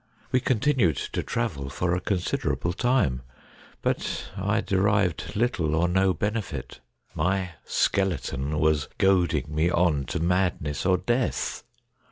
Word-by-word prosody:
We 130 - +4
continued 125 - +2 0.2
to - - 0
travel 85 - -3
for 85 +4 -1
a 90 - 0
considerable 90 -2 -1
time, 120 - +1 0.6
but - - -2
I 105 +3 0
derived 100 -2 +1
little 100 -9 +1
or 85 +2 +2
no 95 +2 +3
benefit. 95 - -3 0.3
My 95 0 0
Skeleton 75 -7 0
was 75 -1 +2
goading 95 -6 +2
me 80 +3 +2
on 85 -6 +2
to - - -3
madness 85 -3 0
or 90 -1 +4
death. 120 +7 -1
90 Hz, 125 wpm, -26 LUFS, 80-100 Hz, 0.6 s, We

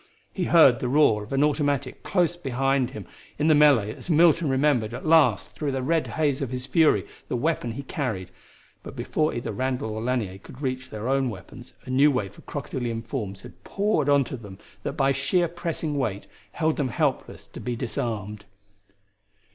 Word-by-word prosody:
He 185 - -1
heard 140 -9 +6
the 125 - -2
roar 125 -7 +4
of 105 - -13
an 135 +1 +2
automatic 145 -3 0
close 175 -2 +1
beside 135 -4 0
him 105 -4 -8 0.3
in 150 - 0
the 155 - +6
melee 140 -8 +5
as - - -9
Milton 165 -1 +4
remembered 130 -5 +1
at - - -8
last 135 - +3
through 145 -2 -2
the 135 -1 -2
red 160 +3 +1
haze 145 -3 +1
of 135 - -2
his 125 0 -4
fury 155 +3 +3 0.2
the - - -2
weapon 125 -3 -1
he 140 +4 -6
carried, 110 - -4 0.5
but - - -10
before 155 0 0
either 120 - -4
Randall 130 -3 -2
or 110 +1 -4
Lanier 115 -6 -2
could 125 - -13
reach 130 0 -3
their 110 +1 -5
own 135 -1 +1
weapons 115 +4 -11
a 130 - -6
new 140 +3 +5
wave 105 -8 -2
of - - -18
crocodilian 120 -5 -4
forms 105 -5 -5
had - - -14
poured 200 -8 0
onto 140 -2 +2
them 100 -6 -10 0.2
that - - -3
by 135 0 +2
sheer 170 +6 +1
pressing 165 -2 -3
weight 105 -7 -2 0.3
held 160 -1 0
them 140 - 0
helpless, - - -2
to - - -11
be 125 -1 -3
disarmed. 105 -4 -4
130 Hz, 185 wpm, -25 LUFS, 115-150 Hz, 0.5 s, heard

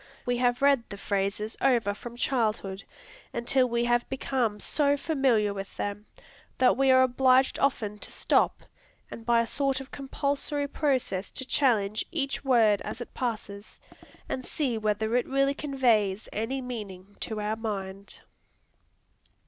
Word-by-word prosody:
We 245 0 0
have 245 +1 +1
read 280 -3 +5
the 200 - -7
phrases 200 +2 -2
over 235 -6 +3
from 235 +3 -9
childhood, 215 -7 -1 0.5
until 250 +2 +2
we 235 0 +1
have 240 0 +1
become 255 -5 -1
so 285 +5 +1
familiar 260 -9 +1
with 195 0 -7
them, 205 +1 -4 0.5
that 255 - +4
we 270 +1 +3
are 260 0 +7
obliged 260 +1 +3
often 215 -7 0
to - - -7
stop, - - +1 0.5
and 230 0 -9
by 235 -1 +5
a - - -1
sort 275 +2 0
of 270 0 -10
compulsory 285 +1 -2
process 260 -10 -1
to 260 - -5
challenge 220 -7 +2
each 280 -6 -2
word 225 -6 +4
as - - -6
it 240 - -8
passes, 215 -4 -5 0.5
and 255 - -3
see 260 -3 -1
whether 220 +1 0
it 250 - +1
really 275 +1 +2
conveys 235 -9 +1
any 245 +5 -2
meaning 205 -5 -7
to 220 -1 -4
our 210 +1 -1
mind. 200 -3 -6
240 Hz, 150 wpm, -28 LUFS, 210-270 Hz, 0.5 s, are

